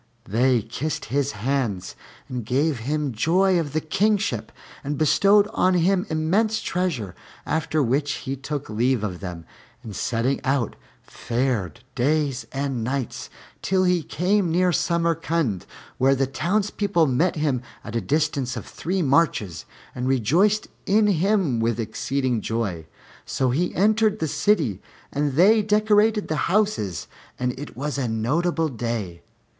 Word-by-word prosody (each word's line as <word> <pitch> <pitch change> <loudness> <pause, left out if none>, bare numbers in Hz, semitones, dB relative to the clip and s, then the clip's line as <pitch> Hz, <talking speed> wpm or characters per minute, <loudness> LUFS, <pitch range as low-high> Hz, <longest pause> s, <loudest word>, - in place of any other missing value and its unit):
They 120 +2 +2
kissed 135 +7 -4
his 140 0 +1
hands 105 -4 -2 0.3
and 125 -2 -4
gave 135 +4 0
him 145 +4 -1
joy 180 - +3
of 150 -4 -3
the 155 - 0
kingship 205 +7 0 0.3
and 145 +1 -3
bestowed 200 +7 +4
on 185 -5 +3
him 185 +3 +2
immense 195 +8 +1
treasures; 160 - -2 0.3
after 160 -1 0
which 140 +3 +1
he 135 - -4
took 145 +2 -5
leave 120 +2 +1
of 90 -5 -3
them, 90 -3 -7 0.4
and 105 -3 -8
setting 120 +6 0
out, 135 -4 0 0.3
fared 120 -5 -2
days 140 0 0
and 135 -4 -2
nights, 130 +1 -3 0.3
till 190 0 +1
he 180 -2 +2
came 180 +5 +1
near 180 +2 +3
Samarcand, 165 - 0 0.3
where 135 +1 +4
the 135 0 +1
townspeople 195 +4 0
met 155 +6 +1
him 145 -5 0 0.2
at 115 +1 -7
a 115 - +1
distance 140 -4 0
of 110 - -6
three 185 +2 -2
marches 135 - +1 0.3
and 125 0 -3
rejoiced 165 - +2 0.2
in 210 +2 +4
him 190 - +2
with 115 0 0
exceeding 125 +2 -1
joy. 100 -8 -3 0.4
So 130 -2 0
he 175 +8 0
entered 215 +2 +3
the 160 - -1
city, 145 - +1 0.3
and 145 -1 0
they 205 +9 +5
decorated 210 0 +3
the 155 - -1
houses 195 - 0 0.3
and 125 0 -1
it 145 - -8
was 145 +1 -2
a 130 - 0
notable 160 +10 0
day. 115 -8 -4
145 Hz, 140 wpm, -24 LUFS, 120-180 Hz, 0.4 s, they